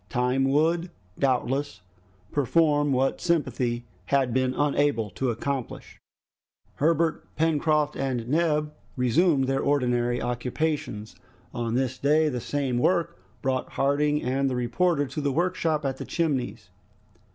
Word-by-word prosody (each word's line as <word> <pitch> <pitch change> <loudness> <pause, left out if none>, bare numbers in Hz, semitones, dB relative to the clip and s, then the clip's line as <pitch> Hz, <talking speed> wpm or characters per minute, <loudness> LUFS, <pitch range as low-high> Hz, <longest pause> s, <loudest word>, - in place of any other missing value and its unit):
Time 125 +1 +1
would 165 +5 +2 0.3
doubtless 135 -2 0 0.5
perform 145 +1 +2
what 135 +1 +1
sympathy 125 -8 0 0.2
had 135 +1 +1
been 130 0 +1
unable 145 -7 +1
to 130 +7 -2
accomplish. 130 +2 -4 0.8
Herbert, 165 +1 +1
Pencroft, 155 -1 +1
and 125 -4 -2
Neb 150 0 +1 0.2
resumed 135 +3 +3
their 135 +1 0
ordinary 125 -3 +1
occupations. 125 -1 -3 0.4
On 120 -1 -2
this 130 0 -1
day 155 +2 +3
the 125 -4 -3
same 135 -3 -1
work 170 +3 +1 0.2
brought 130 -1 -1
Harding 145 +2 +1
and 135 +2 0
the 130 - -2
reporter 145 +6 +1
to 150 - -5
the 140 -1 0
workshop 165 -2 0
at 135 -1 -1
the - - -6
Chimneys. 130 - -2
140 Hz, 125 wpm, -26 LUFS, 125-150 Hz, 0.8 s, resumed